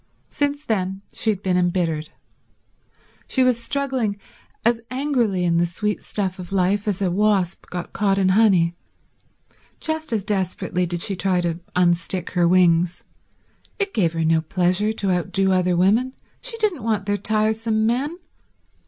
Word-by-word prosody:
Since 290 Hz, +1 st, -1 dB
then 195 Hz, -2 st, -2 dB
she 225 Hz, -, 0 dB
had 200 Hz, -2 st, -1 dB
been 185 Hz, -1 st, +1 dB
embittered. 170 Hz, -4 st, 0 dB, 1.2 s
She 260 Hz, -, +2 dB
was 250 Hz, -2 st, +2 dB
struggling 260 Hz, -7 st, -1 dB, 0.5 s
as 235 Hz, 0 st, +3 dB
angrily 250 Hz, -8 st, 0 dB
in 170 Hz, -1 st, +2 dB
the 175 Hz, +1 st, +2 dB
sweet 210 Hz, +5 st, -2 dB
stuff 190 Hz, -3 st, -3 dB
of 180 Hz, 0 st, -8 dB
life 195 Hz, +2 st, +1 dB
as 200 Hz, -1 st, -1 dB
a 180 Hz, -, +1 dB
wasp 195 Hz, -2 st, +1 dB
got 175 Hz, -1 st, -6 dB
caught 195 Hz, -1 st, +1 dB
in 190 Hz, -1 st, +3 dB
honey. 185 Hz, -5 st, +4 dB, 1.0 s
Just 315 Hz, -2 st, -3 dB
as 215 Hz, -4 st, 0 dB
desperately 185 Hz, -2 st, -1 dB
did 175 Hz, 0 st, -2 dB
she 195 Hz, -, 0 dB
try 185 Hz, 0 st, +1 dB
to 170 Hz, -1 st, -2 dB, 0.2 s
unstick 175 Hz, 0 st, +1 dB
her 175 Hz, -2 st, +2 dB
wings. 175 Hz, -1 st, +3 dB, 0.7 s
It 395 Hz, -1 st, -1 dB
gave 170 Hz, -6 st, +1 dB
her 165 Hz, -1 st, -1 dB
no 160 Hz, 0 st, +3 dB
pleasure 185 Hz, +5 st, +1 dB
to 200 Hz, -3 st, -1 dB
outdo 190 Hz, +2 st, +1 dB
other 180 Hz, -1 st, +2 dB
women; 225 Hz, +9 st, +2 dB, 0.3 s
she -, -, -2 dB
didn't 415 Hz, -, 0 dB
want 215 Hz, -3 st, -1 dB
their 205 Hz, 0 st, +1 dB
tiresome 220 Hz, +1 st, 0 dB
men. 270 Hz, +9 st, 0 dB
195 Hz, 155 wpm, -22 LUFS, 180-225 Hz, 1.2 s, honey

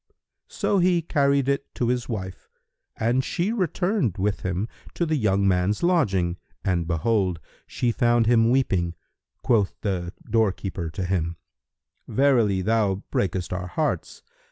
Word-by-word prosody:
So 200 Hz, -, 0 dB
he 175 Hz, -1 st, +3 dB
carried 140 Hz, -4 st, +2 dB
it 140 Hz, 0 st, -1 dB
to 120 Hz, -, 0 dB
his 125 Hz, 0 st, -1 dB
wife 95 Hz, -5 st, -6 dB, 0.5 s
and 120 Hz, +4 st, +1 dB
she 180 Hz, -, -1 dB
returned 185 Hz, -, 0 dB
with 100 Hz, +1 st, 0 dB
him 95 Hz, +3 st, -2 dB, 0.3 s
to 170 Hz, -, 0 dB
the 160 Hz, -1 st, 0 dB
young 100 Hz, -6 st, +2 dB
man's 95 Hz, -, +1 dB
lodging 95 Hz, -, +2 dB, 0.3 s
and 85 Hz, -4 st, 0 dB
behold, 90 Hz, +1 st, +1 dB, 0.3 s
she 120 Hz, -, 0 dB
found 120 Hz, 0 st, +2 dB
him 115 Hz, 0 st, +4 dB
weeping, 95 Hz, -10 st, +1 dB, 0.5 s
quoth 110 Hz, -7 st, +2 dB
the 90 Hz, -4 st, -2 dB, 0.2 s
doorkeeper 95 Hz, -6 st, 0 dB
to 90 Hz, +3 st, -4 dB
him, 85 Hz, -2 st, -1 dB, 0.7 s
"Verily, 120 Hz, -9 st, +2 dB
thou 105 Hz, -2 st, +1 dB
breakest 90 Hz, -1 st, -1 dB
our 90 Hz, 0 st, -3 dB
hearts! 150 Hz, -, -2 dB
110 Hz, 135 wpm, -24 LUFS, 95-135 Hz, 0.7 s, him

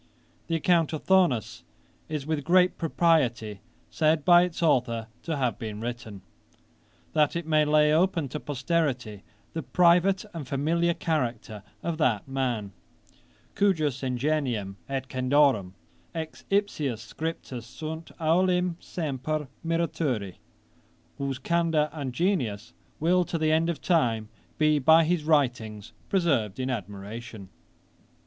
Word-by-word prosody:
The 165 Hz, -, 0 dB
account 165 Hz, -1 st, +2 dB
of 155 Hz, -, -4 dB
Thuanus 180 Hz, -12 st, +2 dB, 0.5 s
is 150 Hz, -3 st, -3 dB
with 155 Hz, -2 st, -2 dB
great 180 Hz, +3 st, +3 dB
propriety 130 Hz, -, +1 dB, 0.3 s
said 155 Hz, -1 st, +2 dB
by 175 Hz, -1 st, +8 dB
its 175 Hz, -1 st, -2 dB
authour 120 Hz, -7 st, +2 dB, 0.2 s
to 160 Hz, -3 st, -3 dB
have 125 Hz, -5 st, -1 dB
been 105 Hz, -2 st, -5 dB
written, 115 Hz, -4 st, -6 dB, 0.9 s
that 150 Hz, 0 st, +2 dB
it 170 Hz, -1 st, -2 dB
might 155 Hz, -1 st, +3 dB
lay 150 Hz, 0 st, +4 dB
open 165 Hz, -2 st, +2 dB
to 150 Hz, -, -4 dB
posterity 130 Hz, -, -2 dB, 0.3 s
the 160 Hz, -, -3 dB
private 180 Hz, +5 st, +3 dB
and 155 Hz, -6 st, -6 dB
familiar 165 Hz, +5 st, +1 dB
character 120 Hz, -9 st, -2 dB, 0.2 s
of 165 Hz, -1 st, -3 dB
that 120 Hz, -8 st, +1 dB
man, 125 Hz, -7 st, -2 dB, 0.8 s
cujus 155 Hz, -10 st, +1 dB
ingenium 125 Hz, -6 st, -1 dB
et 135 Hz, -1 st, -3 dB
candorem 130 Hz, -7 st, +2 dB, 0.4 s
ex 160 Hz, -1 st, -6 dB
ipsius 150 Hz, -, -1 dB
scriptis 160 Hz, -6 st, -4 dB
sunt 160 Hz, +6 st, -7 dB
olim 180 Hz, +1 st, +2 dB
semper 150 Hz, -2 st, -3 dB, 0.2 s
miraturi, 160 Hz, -, -1 dB, 0.8 s
whose 135 Hz, -1 st, -2 dB
candour 165 Hz, 0 st, +1 dB
and 140 Hz, -5 st, -4 dB
genius 120 Hz, -, -1 dB, 0.3 s
will 180 Hz, +3 st, +3 dB
to 170 Hz, -, -3 dB
the 155 Hz, -1 st, +1 dB
end 160 Hz, +2 st, +2 dB
of 170 Hz, -, -2 dB
time 115 Hz, -, +1 dB, 0.3 s
be 155 Hz, -1 st, +3 dB
by 160 Hz, +4 st, +6 dB
his 165 Hz, -1 st, 0 dB
writings 120 Hz, -8 st, 0 dB, 0.2 s
preserved 140 Hz, -, +1 dB
in 130 Hz, 0 st, -1 dB
admiration. 105 Hz, 0 st, -7 dB
150 Hz, 125 wpm, -27 LUFS, 120-165 Hz, 0.9 s, by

